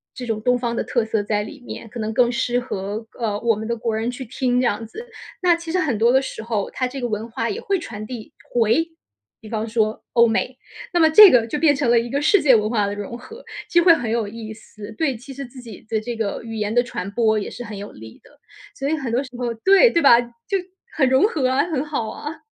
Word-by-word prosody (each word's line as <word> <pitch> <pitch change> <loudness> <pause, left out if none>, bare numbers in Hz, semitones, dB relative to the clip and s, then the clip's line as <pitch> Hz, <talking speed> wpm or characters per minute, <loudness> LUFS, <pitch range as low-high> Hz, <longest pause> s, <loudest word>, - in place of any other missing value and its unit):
这 250 - -6
种 225 -2 -1
东 250 0 +2
方 235 -1 -2
的 - - -1
特 240 - 0
色 220 -2 -1
在 210 0 0
里 280 +6 -10
面， 230 -1 -9
可 235 - -8
能 220 0 -3
更 240 +1 +3
适 245 0 0
合， 215 -1 -5
呃， 210 -3 -1
我 230 -1 +2
们 220 +1 -6
的 235 - -1
国 225 -1 -2
人 225 +3 -1
去 260 +1 -7
听 250 +1 0
这 - - +1
样 225 -1 -1
子。 455 - -10 0.3
那 355 -2 +4
其 335 -1 -7
实 370 - +1
很 275 - 0
多 230 +3 +4
的 265 +1 +4
时 240 - -6
候， 220 -3 -2
它 255 - -1
这 265 +1 -7
个 245 - -1
文 220 +1 -4
化 230 0 -2
也 205 - -3
会 390 -1 -1
传 215 -10 -7
递 230 -1 -8 0.2
回 240 +8 +2 0.5
比 215 - -12
方 220 -1 -3
说 220 -1 -1
欧 235 0 +6
美， 245 +3 -1 0.4
那 350 - +2
么 320 -1 +6
这 415 +5 +10
个 235 -2 +4
就 295 - -3
变 295 -2 +4
成 275 -3 0
了 235 -1 +5
一 235 +1 -4
个 280 +1 0
世 370 +5 +4
界 265 -4 +6
文 215 -1 +1
化 210 -4 +1
的 200 - -3
融 205 +3 -6
合， 450 - -12 0.3
就 345 -1 +4
会 345 - +8
很 235 -7 -3
有 230 -2 0
意 220 +1 -8
思， 215 -1 -12
对 280 -7 0
其 270 +4 -11
实 275 0 -6
自 255 +1 -13
己 230 -5 -11
的 220 - 0
这 235 +2 -5
个 220 -3 -3
语 225 -1 -7
言 210 +1 -2
的 245 - +4
传 200 -5 -5
播 220 -1 +2
也 205 - -5
是 245 - -8
很 210 -3 -8
有 205 +1 -8
利 110 +1 -13
的。 295 - -22 0.4
所 275 - -3
以 315 - +1
很 265 -7 -4
多 245 +3 +1
时 260 - -11
候 245 -1 -2
对， 390 - +5
对 335 - +1
吧？ 240 -3 +7
就， 240 - -4 0.4
很 265 -5 +3
融 265 +5 +4
合 285 - 0
啊， 265 +4 +2
很 305 -5 -2
好 260 -7 -3
啊。 295 +2 -8
235 Hz, 285 characters per minute, -21 LUFS, 220-270 Hz, 0.5 s, 这